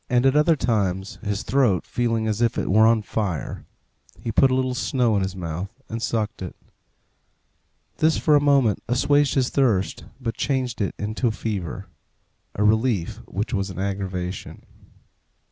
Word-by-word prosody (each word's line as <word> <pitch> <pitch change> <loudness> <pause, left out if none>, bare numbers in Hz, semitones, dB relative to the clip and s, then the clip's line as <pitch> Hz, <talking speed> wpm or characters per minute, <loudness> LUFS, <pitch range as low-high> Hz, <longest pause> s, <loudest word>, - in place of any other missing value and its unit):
At 125 +2 +3
other 155 +2 +5
times, 100 -7 -1
his 100 -2 -2
throat 120 -10 +2
feeling 115 -3 0
as 110 +1 -1
if 120 -1 +2
it - - -1
were 110 +3 +6
on 115 -1 +3
fire, 100 -7 -3 0.5
he 115 - -3
put 130 +4 +4
a 130 - +1
little 130 -1 0
snow 125 -3 +1
in 100 - +2
his 95 0 -2
mouth 90 +1 -4 0.2
and 115 0 -4
sucked 110 -2 -2
it; 90 - -6 1.4
this 160 0 +3
for 150 - +3
a 145 - +5
moment 140 -7 +3
assuaged 145 +4 +2
his 130 -2 +2
thirst, 115 -9 +1
but 115 - -3
changed 130 -4 -1
it 100 - -1
into 110 +4 -1
fever 100 -4 -4 0.7
a 105 - 0
relief 110 -3 +1
which 105 +6 -3
was 100 -2 -1
an 95 - -8
aggravation. 95 -2 -4
110 Hz, 160 wpm, -23 LUFS, 100-130 Hz, 1.4 s, were